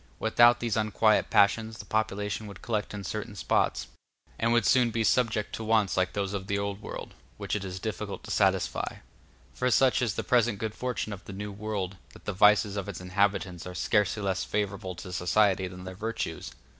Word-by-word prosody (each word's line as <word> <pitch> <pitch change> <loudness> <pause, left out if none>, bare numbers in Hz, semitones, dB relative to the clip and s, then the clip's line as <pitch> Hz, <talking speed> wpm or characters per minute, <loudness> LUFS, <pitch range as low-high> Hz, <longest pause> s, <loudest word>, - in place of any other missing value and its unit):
Without 120 +1 +5
these 115 -3 0
unquiet 110 0 +2
passions 110 +2 +3
the 105 - -9
population 105 0 -2
would 100 - -11
collect 110 -3 -2
in 105 -1 -6
certain 105 +2 -5
spots, 95 - +1 0.5
and 115 +1 +2
would 120 0 +3
soon 125 -2 +4
be 115 0 -1
subject 110 -1 +1
to 110 - -4
wants 110 -4 +2
like 95 0 +1
those 100 -1 -2
of 95 -1 -4
the 100 - 0
Old 100 0 -3
World, - - -7 0.2
which - - -3
it 105 - -2
is 95 -1 -5
difficult 110 -1 -5
to - - -7
satisfy; - - +1 0.6
for 125 - 0
such 130 +1 +4
is 115 -4 0
the - - -2
present 120 -4 +2
good 110 +1 -3
fortune 125 -4 -3
of 100 0 -10
the 100 - -8
New 105 +1 -5
World, 100 -2 -4 0.2
that - - -16
the 105 - -2
vices 105 +1 +4
of 100 0 -3
its 95 - -6
inhabitants 95 -1 0
are 90 - -7
scarcely 105 +2 +1
less 95 -1 0
favorable 95 -3 -3
to 90 +1 -8
society 95 +1 +2
than 90 0 -9
their 95 0 -7
virtues. 110 +4 -4
105 Hz, 200 wpm, -28 LUFS, 95-110 Hz, 0.6 s, Without